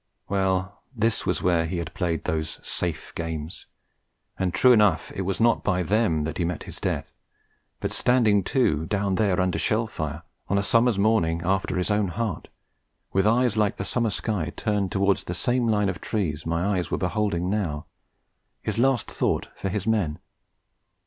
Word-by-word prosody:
Well, 95 0 0
this 115 0 +1
was - - 0
where 85 -2 +3
he 90 +2 -3
had 85 -1 -4
played 85 -4 -1
those 80 -1 -2
safe 80 -3 -3
games; 80 -1 -5 0.7
and 95 -1 +1
true 125 +7 +5
enough, 105 -8 +4
it - - -3
was 95 0 -2
not 115 0 +3
by 90 -2 +1
them 85 -6 +1
he 85 - -1
met 85 -1 -2
his - - -9
death, - - -3 0.7
but - - -2
standing 110 -5 +3
to 80 - +1
down 100 -2 0
there 95 -2 +2
under 90 -1 +1
shell 110 +2 +1
fire, 80 -7 -5 0.2
on 100 - +1
a 100 - +1
summer's 115 0 +3
morning 90 -6 +2
after 95 +1 0
his 90 +3 0
own 105 -1 +2
heart, 105 +1 -3 0.7
with 95 +2 +3
eyes 120 +1 +3
like 105 -2 +1
the 95 - -3
summer 115 0 0
sky 95 -4 -2
turned 105 -4 -1
towards 100 0 +2
the 90 - -4
same 120 +6 +1
line 105 -2 +2
of 90 -3 -3
trees 80 -8 -2
my 90 +4 +1
eyes 90 - -3
were - - 0
beholding 95 -2 0
now, 90 -8 -1 0.8
his - - -2
last 130 -3 +3
thought - - -1
for 95 - -3
his 100 0 -2
men. 100 -9 +1
95 Hz, 175 wpm, -25 LUFS, 85-110 Hz, 0.8 s, true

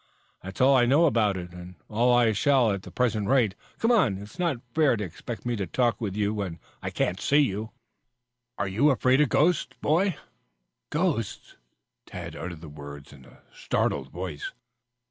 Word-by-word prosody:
"That's 95 +1 -9
all 135 +2 +6
I 120 -2 +4
know 145 +7 +5
about 110 - +2
it, 90 -1 -7
and 90 +1 -10
all 120 +3 +2
I 120 -2 +4
shall 125 +1 +3
at 100 -1 -2
the - - -11
present 110 -5 0
rate. 125 -7 +3 0.2
Come 230 - +2
on, 125 - +3
it's 105 - -11
not 170 -7 +1 0.2
fair 150 -7 +3
to 105 - -3
expect 95 +5 -7
me 120 -1 0
to 100 -3 -3
talk 120 +3 0
with 100 -4 -3
you 105 0 0
when 100 -6 -4 0.2
I - - -3
can't 95 - -1
see 145 - +3
you 110 -5 -1 0.4
" 125 0 -57
"Aren't 95 -1 -2
you 140 +9 +4
afraid 130 +1 +3
of 150 - +3
ghosts, 170 +8 +1
boy 175 +4 +1 0.4
" - - -54
"Ghosts!" 150 - -2 0.5
Tad - - -7
uttered 85 -3 -7
the 80 - -9
word 70 -1 -10
in 65 -2 -15
a - - -19
startled 65 -1 -1
voice. 85 -3 -5
110 Hz, 190 wpm, -26 LUFS, 95-130 Hz, 0.5 s, all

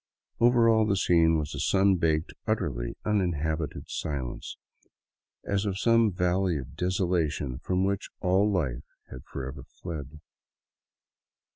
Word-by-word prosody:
Over 120 0 +5
all 110 -1 +4
the 100 - +2
scene 85 -3 +4
was 75 -2 -3
a - - -5
sun 95 -1 +3
baked, 80 -2 0
utterly 65 - -1
unin 95 -5 +1
habited 80 0 -2
silence, 65 -5 -4 0.9
as 100 0 0
of 95 -1 -2
some 115 0 +4
valley 90 -1 +1
of 65 0 -8
desolation 85 -7 -1
from 90 +4 0
which 100 0 -2
all 95 +2 +3
life 70 -10 -1 0.3
had 65 - -9
forever 65 +1 -6
fled. 75 -3 -8
90 Hz, 130 wpm, -28 LUFS, 75-100 Hz, 0.9 s, Over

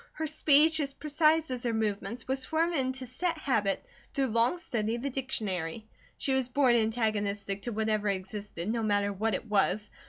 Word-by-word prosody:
Her 315 - -3
speech, 310 +1 +4
as 280 -2 -2
precise 305 0 +2
as 250 -1 -3
her 235 -2 -1
movements, 220 +1 -2
was 265 0 -1
formed 330 +4 0
into 260 -2 -1
set 330 +7 -2
habit 220 - 0 0.3
through 270 -3 +1
long 230 +8 +2
study 225 -9 -2
of 240 - -6
the 280 - -1
dictionary. 215 -7 -2 0.3
She 270 - 0
was 260 -2 +1
born 255 -1 +4
antagonistic 210 -3 0
to 240 - -3
whatever 215 -1 0
existed, 195 -2 -4
no 230 +1 0
matter 205 -1 +1
what 215 +1 0
it 230 - -5
was. 210 0 +1
230 Hz, 180 wpm, -30 LUFS, 210-275 Hz, 0.3 s, speech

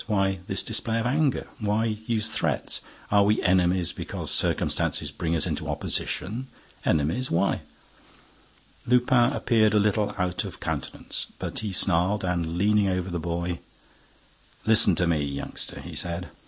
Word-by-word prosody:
Why 95 -3 +1
this - - +1
display 115 0 -1
of 115 - -2
anger? 140 +2 +1
Why 105 +1 +1
use 110 0 -1
threats? - - -1 0.3
Are 100 0 +5
we 105 +2 +3
enemies 90 -1 +3
because - - -3
circumstances - - +1
bring 85 0 -2
us 80 - +4
into - - -3
opposition? 115 +8 -2 0.4
Enemies? 80 - +1
Why?" 85 - +1 1.3
Lupin 125 0 +4
appeared 110 -5 +2
a - - +5
little 105 0 +1
out 90 -1 -1
of - - -8
countenance, - - -3
but - - -4
he 105 -2 -3
snarled 95 +2 +2
and, 85 -2 -1
leaning 105 +1 +3
over 90 -1 -1
the 85 - -2
boy: 85 +1 -3 1.1
"Listen 110 -4 +6
to 90 - +1
me, 80 -4 +1
youngster," 70 -1 -4
he - - -9
said. 85 +1 -3
100 Hz, 145 wpm, -26 LUFS, 85-110 Hz, 1.3 s, Listen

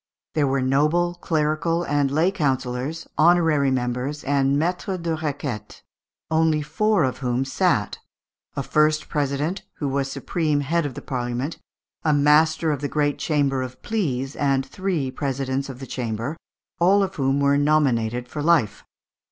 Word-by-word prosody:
There 150 -2 +2
were 135 -1 +1
noble, 150 +7 +2
clerical, 165 0 0
and 145 -3 +1
lay 160 +7 +2
councillors, 135 -1 -2
honorary 160 -4 +4
members, 130 +3 -2
and 140 0 +2
maîtres 180 +4 -1
de 165 -1 0
requête, 140 -8 -5 0.5
only 160 -1 +2
four 200 +5 +1
of 130 -1 -1
whom 125 0 0
sat; 135 - 0 0.6
a - - -2
first 155 0 +2
president, 150 +6 -1
who 145 - -3
was 135 0 -1
supreme 150 +2 -1
head 160 +2 0
of 130 - -8
the - - -8
Parliament, 125 +3 -3 0.4
a 155 - +3
master 155 +2 +4
of 145 -2 -2
the 145 - -2
great 145 -1 0
chamber 140 -4 +1
of 130 0 -6
pleas, 140 - -2
and 135 -2 +1
three 165 -4 -2
presidents 135 0 -2
of 130 - -7
the 135 - -8
chamber, 120 +3 -3 0.4
all 195 +4 +4
of 190 - -3
whom 135 0 +1
were 140 0 +3
nominated 125 -5 +1
for 150 +4 -5
life. 150 -9 +2
145 Hz, 150 wpm, -23 LUFS, 135-160 Hz, 0.6 s, honorary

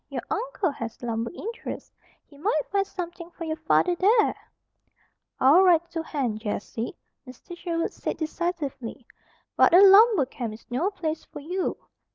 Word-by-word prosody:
Your - - -4
uncle 430 -5 -1
has 230 -5 -7
lumber 230 -1 -2
interests. 450 +6 -7 0.3
He 285 - -20
might 305 0 0
find 395 -1 +1
something 345 -2 -7
for 345 - -9
your 315 -1 -2
father 320 +3 +2
there." 425 +5 +3 1.0
"I'll 290 +8 +6
write 345 -2 +4
to 330 - -2
Hen, 265 -9 -2
Jessie," 220 +2 -4 0.3
Mr. 255 +8 -11
Sherwood 335 -1 -2
said - - -4
decisively. 310 -7 -4 0.5
"But 345 - +5
a - - +9
lumber 400 - +7
camp 240 -4 -6
is 225 - -17
no 300 +11 +1
place 325 -6 -4
for - - -10
you. 360 +5 -2
330 Hz, 155 wpm, -26 LUFS, 270-370 Hz, 1.0 s, a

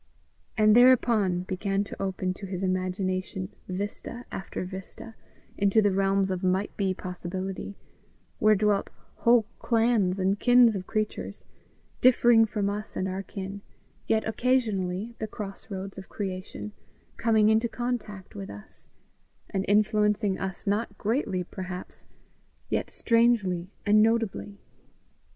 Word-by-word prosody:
And 215 0 +5
thereupon 230 -7 +5
began 195 +2 -1
to 200 - -8
open 185 -1 -1
to 195 +1 -8
his 185 0 -4
imagination 185 0 -2 0.2
vista 205 +5 -5
after 190 -1 -5
vista 190 +4 -9 0.5
into 200 +2 +4
the 205 -2 +3
realms 195 0 +2
of 185 -1 -2
might 185 +2 0
be 195 -2 0
possibility 185 +2 -5 0.6
where 215 0 +5
dwelt 205 0 +1 0.3
whole 235 -2 +4
clans 225 -5 +2
and 195 +1 +1
kins 245 -3 +6
of 185 -1 -5
creatures, 215 -1 -3 0.6
differing 240 -2 +6
from 210 -2 -1
us 210 +1 -4
and 185 - -1
our 190 +1 -3
kin, 195 +1 -7 0.5
yet 220 -1 +1
occasionally, 220 -4 0
at 235 - -23
the 220 - -2
cross 210 0 -8
roads 195 0 -6
of 190 - -11
creation, 195 +1 -5 0.5
coming 220 -2 +4
into 220 +2 +3
contact 225 -6 -4
with 100 -1 -7
us, 100 0 -12 0.6
and 190 - 0
influencing 210 -1 +2
us 190 -2 -5
not 205 +1 -1
greatly, 215 -5 -1
perhaps, 185 0 -7 0.6
yet - - -1
strangely 225 -7 +2 0.2
and 210 0 +5
notably. 225 -2 0
200 Hz, 130 wpm, -27 LUFS, 190-220 Hz, 0.6 s, kins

